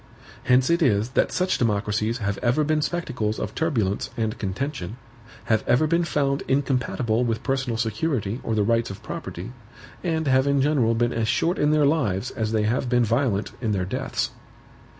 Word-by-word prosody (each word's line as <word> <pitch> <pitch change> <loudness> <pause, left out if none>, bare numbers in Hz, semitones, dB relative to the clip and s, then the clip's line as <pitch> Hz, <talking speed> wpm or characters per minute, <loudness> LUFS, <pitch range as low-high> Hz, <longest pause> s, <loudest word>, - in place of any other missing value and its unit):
Hence 130 +4 +4
it 170 +1 +2
is 110 -5 +2
that 130 - +1
such 185 0 0
democracies 110 0 0
have 100 -4 -2
ever 125 +5 +2
been 155 +1 +1
spectacles 125 -11 -2
of - - -4
turbulence 130 - 0
and 110 -1 -1
contention; 110 0 -4 0.5
have 110 -1 +1
ever 125 +6 +4
been 170 +2 +2
found 140 -3 0
incompatible 130 -4 0
with 115 0 -1
personal 130 -4 -1
security 115 - -1
or 115 - -2
the 105 - +2
rights 115 +2 +1
of 100 - -9
property; 90 +8 -6 0.5
and 160 -3 0
have 130 0 +3
in 140 0 +3
general 135 -5 +2
been 120 +1 +1
as 115 -1 -1
short 170 - +1
in 150 - +3
their 150 -1 +4
lives 130 - +1
as 110 -1 -2
they 110 -1 +1
have 120 +3 0
been 120 -1 +3
violent 115 -3 0
in 110 -4 0
their 95 -2 0
deaths. 95 - -2
120 Hz, 180 wpm, -24 LUFS, 110-140 Hz, 0.5 s, Hence